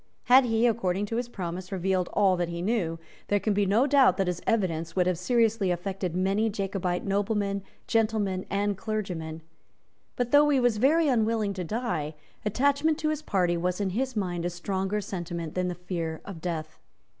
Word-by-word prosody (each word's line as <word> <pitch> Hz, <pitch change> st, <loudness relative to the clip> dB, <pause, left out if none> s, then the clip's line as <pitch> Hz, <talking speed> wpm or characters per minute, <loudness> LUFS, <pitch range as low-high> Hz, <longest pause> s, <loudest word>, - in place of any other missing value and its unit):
Had 255 Hz, +1 st, +6 dB
he, 225 Hz, 0 st, +2 dB
according 205 Hz, -4 st, +1 dB
to 225 Hz, +2 st, -3 dB
his 240 Hz, 0 st, -2 dB
promise, 180 Hz, -2 st, -5 dB
revealed 185 Hz, -1 st, 0 dB
all 195 Hz, -3 st, +4 dB
that 175 Hz, -1 st, -1 dB
he 170 Hz, 0 st, -4 dB
knew, 185 Hz, -6 st, 0 dB, 0.3 s
there 205 Hz, -, +2 dB
can 210 Hz, +1 st, 0 dB
be 200 Hz, 0 st, +1 dB
no 220 Hz, +7 st, +4 dB
doubt 280 Hz, -2 st, +5 dB
that 195 Hz, -, +1 dB
his 180 Hz, -1 st, -2 dB
evidence 165 Hz, -7 st, 0 dB
would 180 Hz, -1 st, +3 dB
have 180 Hz, -2 st, 0 dB
seriously 225 Hz, 0 st, +2 dB
affected 180 Hz, 0 st, -2 dB
many 195 Hz, +4 st, +1 dB
Jacobite 195 Hz, -3 st, -2 dB
noblemen, 200 Hz, 0 st, 0 dB, 0.2 s
gentlemen 215 Hz, -4 st, +1 dB
and 205 Hz, 0 st, 0 dB
clergymen. 180 Hz, -7 st, -4 dB, 0.7 s
But, 245 Hz, -1 st, -1 dB
though 295 Hz, +1 st, +6 dB
he 280 Hz, -2 st, +4 dB
was 245 Hz, -3 st, +2 dB
very 305 Hz, +8 st, +4 dB
unwilling 225 Hz, -5 st, +1 dB
to 185 Hz, -2 st, -4 dB
die, 170 Hz, -7 st, -2 dB, 0.3 s
attachment 280 Hz, +8 st, +2 dB
to 310 Hz, -1 st, -1 dB
his 310 Hz, -1 st, -2 dB
party 180 Hz, -, +1 dB
was 180 Hz, +2 st, -1 dB
in 195 Hz, -2 st, 0 dB
his 255 Hz, +5 st, -2 dB
mind 175 Hz, -5 st, -2 dB
a 175 Hz, -, 0 dB
stronger 190 Hz, +3 st, -2 dB
sentiment 170 Hz, -4 st, -5 dB
than 180 Hz, 0 st, 0 dB
the 180 Hz, -, -3 dB
fear 170 Hz, -3 st, -4 dB
of 190 Hz, -5 st, -8 dB
death. 160 Hz, -3 st, -4 dB
195 Hz, 185 wpm, -27 LUFS, 180-225 Hz, 0.7 s, Had